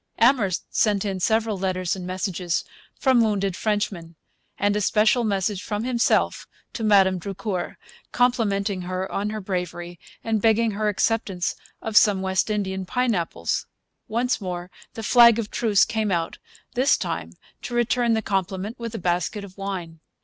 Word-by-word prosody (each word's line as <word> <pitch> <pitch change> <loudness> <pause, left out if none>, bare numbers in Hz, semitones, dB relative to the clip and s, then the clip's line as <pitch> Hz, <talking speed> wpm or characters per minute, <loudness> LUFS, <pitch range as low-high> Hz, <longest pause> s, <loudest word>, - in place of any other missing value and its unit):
Amherst 225 -6 +2
sent 210 -2 +2
in 195 -2 -2
several 220 +1 +1
letters 185 -1 -1
and 180 -1 -7
messages 185 -2 -2 0.4
from 260 -4 +4
wounded 200 -4 +1
Frenchmen, 195 -6 -2 0.4
and 205 0 +1
a 210 - 0
special 215 +4 +3
message 200 -2 0
from 210 0 -3
himself 245 -1 +1 0.3
to 230 - -4
Madame 195 -3 +4
Drucour, 190 0 -4 0.3
complimenting 205 -6 +1
her 185 +1 -3
upon 200 +2 -2
her 215 0 -4
bravery, 180 -3 -4 0.2
and 220 -2 0
begging 225 +1 +3
her 210 +1 0
acceptance 200 -3 0 0.3
of 220 -1 -4
some 205 -3 +5
West 190 +2 +1
Indian 190 -3 -2
pineapples. 205 -4 -1 0.4
Once 240 +2 0
more 180 -1 -5 0.2
the 225 - -6
flag 235 0 +7
of 220 -3 -3
truce 215 -4 +3
came 220 -2 -1
out, 170 -3 -1 0.3
this 260 +4 +3
time - - -4 0.3
to 240 - -5
return 240 0 +2
the 220 - -1
compliment 195 +3 -2
with 230 -1 -5
a - - -2
basket 180 +3 -1
of 190 -2 -11
wine. 185 -5 -5
205 Hz, 155 wpm, -24 LUFS, 185-225 Hz, 0.4 s, flag